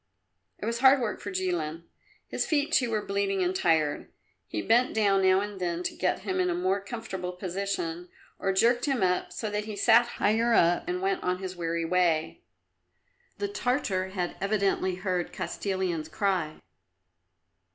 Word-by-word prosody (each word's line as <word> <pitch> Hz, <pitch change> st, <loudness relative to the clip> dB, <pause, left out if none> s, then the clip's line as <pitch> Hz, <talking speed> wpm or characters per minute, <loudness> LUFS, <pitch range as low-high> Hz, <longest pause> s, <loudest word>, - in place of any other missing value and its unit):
It -, -, -6 dB
was 230 Hz, +1 st, -1 dB
hard 265 Hz, +2 st, +6 dB
work 235 Hz, -4 st, -2 dB
for -, -, -6 dB
Jilin; 175 Hz, -4 st, -2 dB, 0.4 s
his -, -, -2 dB
feet, 300 Hz, -2 st, +1 dB
too, 250 Hz, -6 st, +3 dB
were 215 Hz, -2 st, -1 dB
bleeding 195 Hz, -1 st, 0 dB
and 180 Hz, +1 st, 0 dB
tired. 155 Hz, -5 st, +1 dB, 0.4 s
He 105 Hz, -, -4 dB
bent 240 Hz, +2 st, +3 dB
down 200 Hz, -3 st, +3 dB
now 190 Hz, 0 st, +4 dB
and 205 Hz, -2 st, -6 dB
then 175 Hz, 0 st, -2 dB
to -, -, -3 dB
get 185 Hz, 0 st, 0 dB
him 190 Hz, -2 st, -2 dB
in 180 Hz, 0 st, +2 dB
a 175 Hz, -, 0 dB
more 185 Hz, +3 st, 0 dB
comfortable 195 Hz, -5 st, -5 dB
position, 180 Hz, -2 st, -3 dB, 0.3 s
or 195 Hz, -, 0 dB
jerked 235 Hz, +5 st, +3 dB
him 270 Hz, -8 st, 0 dB
up 180 Hz, 0 st, +1 dB
so 215 Hz, -2 st, -4 dB
that 210 Hz, 0 st, -2 dB
he 215 Hz, -1 st, -6 dB
sat 235 Hz, +3 st, +5 dB
higher 230 Hz, +2 st, +2 dB
up, 175 Hz, +1 st, +3 dB
and 180 Hz, +1 st, -2 dB
went 195 Hz, 0 st, 0 dB
on 180 Hz, 0 st, 0 dB
his 185 Hz, -1 st, -6 dB
weary 170 Hz, -1 st, -2 dB
way. 175 Hz, -, +1 dB, 1.0 s
The 405 Hz, -, -2 dB
Tartar 245 Hz, -, -1 dB
had 180 Hz, -2 st, -3 dB
evidently 195 Hz, -2 st, +1 dB
heard 185 Hz, -2 st, -2 dB
Kostilin's 185 Hz, -5 st, -3 dB
cry. 175 Hz, -3 st, -1 dB
190 Hz, 170 wpm, -28 LUFS, 180-215 Hz, 1.0 s, hard